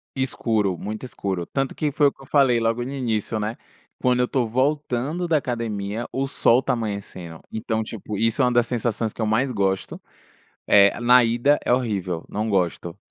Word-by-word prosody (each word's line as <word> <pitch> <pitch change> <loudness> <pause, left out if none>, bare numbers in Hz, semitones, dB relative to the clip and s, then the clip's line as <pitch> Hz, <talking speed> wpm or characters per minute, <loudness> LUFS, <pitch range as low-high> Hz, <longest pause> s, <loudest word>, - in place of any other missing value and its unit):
Escuro, 110 -7 0
muito 110 +7 -6
escuro, 95 -7 -3
tanto 135 +5 -2
que 150 - -1
foi 145 0 +3
o - - +1
que - - -21
eu - - -12
falei 135 -4 +3
logo 115 +1 0
no 130 - -5
início, 115 -5 -2
né, 105 +2 -2 0.4
quando 125 -1 +1
eu 125 - +2
tô 130 -2 0
voltando 140 +5 -1
da 165 -2 +2
academia, 115 -4 -3
o 135 +1 -1
sol 125 -2 +3
tá - - 0
amanhecendo, 100 -7 -5
então 110 0 -2
tipo, 110 -1 -6
isso 115 +5 +1
é - - +5
uma 125 - +2
das 120 -1 +3
sensações 115 -2 -1
que - - -7
eu - - +1
mais 120 +5 +1
gosto. 95 -2 -1 0.7
Eh, 100 +1 +5
na 125 +1 +6
ida 120 +6 +2
é - - 0
horrível, 100 -9 -1
não 110 +2 -3
gosto, 90 -2 -1
115 Hz, 190 wpm, -23 LUFS, 105-130 Hz, 0.7 s, na